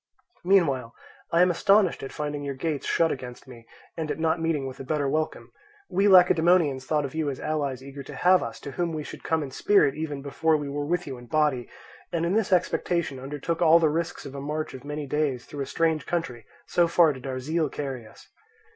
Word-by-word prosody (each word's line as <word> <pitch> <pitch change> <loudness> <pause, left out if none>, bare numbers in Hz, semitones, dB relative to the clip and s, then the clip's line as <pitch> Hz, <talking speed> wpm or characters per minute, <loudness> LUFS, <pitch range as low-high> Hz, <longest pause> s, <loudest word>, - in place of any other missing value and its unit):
Meanwhile 145 -11 +2 0.4
I 170 +1 +5
am 180 - +3
astonished 195 +1 +3
at 135 - -6
finding 150 -1 -4
your 140 -1 -4
gates 145 +1 -3
shut 165 -1 +2
against 125 0 -7
me, 115 -3 -13 0.3
and 160 -2 -4
at - - -2
not 160 +1 0
meeting 160 -4 0
with 130 -1 -7
a - - -5
better 145 +1 -1
welcome. 155 +3 -2 0.4
We 195 +3 +3
Lacedaemonians 175 -7 +5
thought 150 -2 +1
of 135 - -6
you 155 -2 -1
as 135 - -5
allies 140 -4 -2
eager 140 +1 -8
to 135 - -9
have 185 +1 +4
us, - - -6
to 140 - -7
whom 170 +3 -2
we 155 -1 -3
should - - -10
come 160 -1 0
in 135 - -7
spirit 200 -3 +3
even 150 -2 -5
before 155 +3 +1
we 145 -1 -5
were 145 +1 -3
with 175 +2 0
you 130 -3 -7
in 120 - -13
body; 150 -4 +1 0.4
and 170 -1 0
in 170 - 0
this 215 -2 +1
expectation 170 -5 0
undertook 145 +5 -4
all 165 -1 +7
the 165 -2 +3
risks 165 +3 -3
of 140 - -8
a 140 - -6
march 150 +2 -3
of 130 - -9
many 145 +1 -5
days 140 -3 -1
through 145 - -7
a 135 - -3
strange 160 -3 0
country, 130 -11 -3 0.2
so 175 -1 +2
far 165 -2 +4
did 130 0 -9
our 130 -1 -3
zeal 155 +3 -1
carry 130 -6 -5
us. - - -17
150 Hz, 225 wpm, -26 LUFS, 135-165 Hz, 0.4 s, all